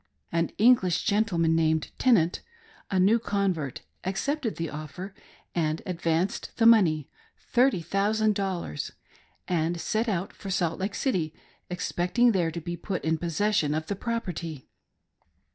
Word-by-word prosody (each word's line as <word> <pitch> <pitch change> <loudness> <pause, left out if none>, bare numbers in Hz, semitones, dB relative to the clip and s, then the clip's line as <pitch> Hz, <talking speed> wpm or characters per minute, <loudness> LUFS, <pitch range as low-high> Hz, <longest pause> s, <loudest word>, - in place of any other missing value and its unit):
An 165 0 +1
English, 215 -7 +4
gentleman 175 -6 +2
named 160 -1 +1
Tenant, 190 -10 +3 0.5
a 190 - +1
new 205 +6 +5
convert, 190 - -1 0.2
accepted 230 +6 -1
the 165 - -3
offer 155 +6 -7 0.4
and 160 -2 -1
advanced 170 +1 -1
the 230 - +3
money— 175 -11 +5 0.3
thirty 245 -7 +2
thousand 210 +5 +1
dollars 190 - -3 0.3
— - - -31 0.2
and 170 -1 0
set 225 +6 0
out 185 -2 -2
for 195 - -8
.Salt 175 -3 0
Lake 195 +2 -2
City, 175 - -1 0.3
expecting 180 +6 +1
there 180 -5 +1
to 165 +1 -5
be 175 +2 -4
put 180 +1 -4
in 160 0 +1
possession 170 -2 +1
of 155 0 -2
the 200 - -3
property. 180 - -4
180 Hz, 140 wpm, -27 LUFS, 165-210 Hz, 0.5 s, new